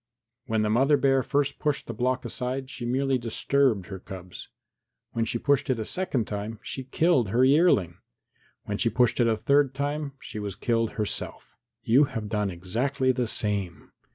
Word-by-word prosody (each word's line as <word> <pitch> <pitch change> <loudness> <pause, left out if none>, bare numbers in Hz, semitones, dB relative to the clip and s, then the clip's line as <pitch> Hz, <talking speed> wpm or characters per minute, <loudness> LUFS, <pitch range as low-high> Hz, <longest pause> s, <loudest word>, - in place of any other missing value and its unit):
When 110 -2 +1
the 105 - 0
mother 135 +6 +4
bear 135 -1 +3
first 140 +2 -1
pushed 150 -2 -1
the 115 - -6
block 125 +3 -1
aside 130 +2 -3
she 120 -4 -5
merely 135 +1 +1
disturbed 120 -2 +1
her 95 0 -8
cubs; 90 -1 -9 0.6
when 115 -1 -1
she 115 - -2
pushed 140 +3 +1
it 130 - +1
a 110 - -3
second 175 - -1
time, 105 +2 -5
she 130 - -6
killed 130 - +2
her 125 +6 +3
yearling; 130 - +3 0.6
when 105 0 -4
she 115 - +2
pushed 120 +2 +2
it 120 - +4
a 110 -1 +1
third 140 +1 +2
time, 145 0 -3
she 110 - -7
was 100 -2 -5
killed 115 0 0
herself. 105 -2 -4 0.3
You 130 +6 +5
have 110 -5 -5
done 105 -2 0
exactly 120 +10 0
the 125 -2 -1
same. 100 -5 0
120 Hz, 180 wpm, -26 LUFS, 105-135 Hz, 0.6 s, You